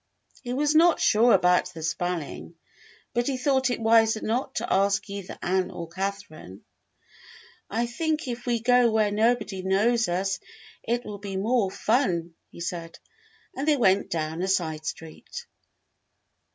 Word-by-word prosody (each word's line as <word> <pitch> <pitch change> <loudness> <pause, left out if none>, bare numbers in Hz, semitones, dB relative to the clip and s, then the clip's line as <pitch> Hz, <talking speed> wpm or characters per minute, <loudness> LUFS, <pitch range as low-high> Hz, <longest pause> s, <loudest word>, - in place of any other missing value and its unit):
He 245 - -6
was 295 +3 +1
not 330 +1 +5
sure 230 +3 +4
about 180 -2 +4
the 160 - -7
spelling, 170 0 -3 0.6
but 240 0 0
he 270 -2 -1
thought 265 0 +1
it 245 - -2
wiser 225 -1 +4
not 240 +4 -2
to - - -1
ask 200 +2 +2
either 200 -2 -7
Ann 185 +1 0
or 170 -1 -7
Catherine, 185 - -6 1.1
"I 230 +3 0
think 310 +5 -2
if 240 0 -5
we 240 -1 +1
go 245 0 +4
where 215 -2 +2
nobody 215 -2 +1
knows 210 +4 +2
us 190 +2 -1 0.4
it 240 +1 -2
will 205 -1 -7
be 195 -1 -5
more 215 0 +1
fun," 185 -6 0 0.2
he - - -12
said, 170 -1 -5 0.6
and 275 +3 -3
they 300 -2 +4
went 195 -5 +3
down 160 0 -3
a 190 - -1
side 160 -5 -1
street. 165 - -8
205 Hz, 150 wpm, -26 LUFS, 180-240 Hz, 1.1 s, not